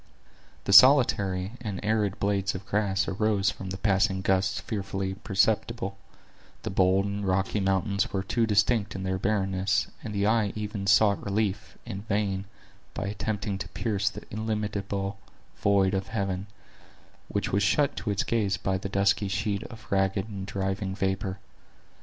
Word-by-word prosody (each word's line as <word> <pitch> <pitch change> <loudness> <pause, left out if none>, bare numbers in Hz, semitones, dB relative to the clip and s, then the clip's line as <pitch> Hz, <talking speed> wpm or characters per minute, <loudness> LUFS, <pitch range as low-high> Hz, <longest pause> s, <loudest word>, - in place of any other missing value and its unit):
The 100 - 0
solitary 100 -7 +6
and 105 -5 -4
arid 105 -2 +1
blades 100 -1 0
of 95 +1 -7
grass 100 -2 0
arose 100 -1 +1
from 95 - -8
the 95 - -4
passing 95 -1 +1
gusts 95 +1 +1
fearfully 95 -3 -3
perceptible; 100 +1 0 0.7
the - - -3
bold 95 +1 +3
and 100 0 -3
rocky 95 +2 0
mountains 95 0 0
were 95 -1 -1
too 115 +4 0
distinct 105 0 +2
in 95 - -4
their 95 0 -1
barrenness, 95 -2 0
and - - -5
the 100 -1 0
eye 110 -2 +2
even 105 -2 -4
sought 100 0 +4
relief, 100 0 -2
in 100 -4 -5
vain, 100 -2 -1 0.5
by - - -3
attempting 105 -1 -3
to - - -5
pierce 100 -4 -1
the - - -9
illimitable 105 -2 -3 0.4
void 100 -1 +3
of 95 0 -1
heaven, 100 -3 -2 0.8
which - - -2
was 100 - +2
shut 140 +8 +2
to 110 - -3
its 100 -2 +1
gaze 105 -4 0
by 95 -1 -1
the 100 - -5
dusky 100 +1 +2
sheet 100 +1 -1
of 110 -2 -11
ragged 95 +1 +1
and 100 -3 -6
driving 95 0 -2
vapor. 95 0 -1
100 Hz, 155 wpm, -27 LUFS, 95-105 Hz, 0.8 s, solitary